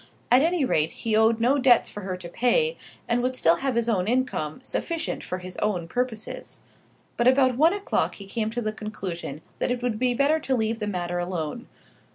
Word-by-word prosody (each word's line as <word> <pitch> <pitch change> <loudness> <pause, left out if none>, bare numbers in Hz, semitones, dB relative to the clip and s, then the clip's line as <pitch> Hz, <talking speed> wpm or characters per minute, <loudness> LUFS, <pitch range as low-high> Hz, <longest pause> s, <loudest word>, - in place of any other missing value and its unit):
At 250 +2 +7
any 330 -2 +2
rate 155 -9 +1
he 225 -2 -1
owed 220 +1 +4
no 255 +5 +3
debts 255 -2 +5
for 210 - -7
her 185 -1 -4
to 180 -1 -8
pay, 465 - +2 0.3
and 240 +1 +1
would 255 +1 -1
still 170 -8 +4
have 270 -3 -1
his 235 -1 +1
own 195 -5 +1
income, 240 -11 -1
sufficient 335 -1 -2
for 185 - -4
his 185 0 -7
own 180 -6 -1
purposes. 240 +1 -4 0.6
But 240 - +3
about 260 -1 +4
one 320 +7 +4
o'clock 405 -1 -1
he 200 - -9
came 215 +2 -2
to 240 +2 -3
the 215 -1 -2
conclusion 185 -8 -6 0.2
that - - 0
it 245 0 -2
would 230 -3 -1
be 250 -1 +1
better 285 +5 +3
to 270 -3 0
leave 225 -1 -1
the 210 - -2
matter 175 -3 -2
alone. 175 - -4
230 Hz, 205 wpm, -25 LUFS, 185-255 Hz, 0.6 s, At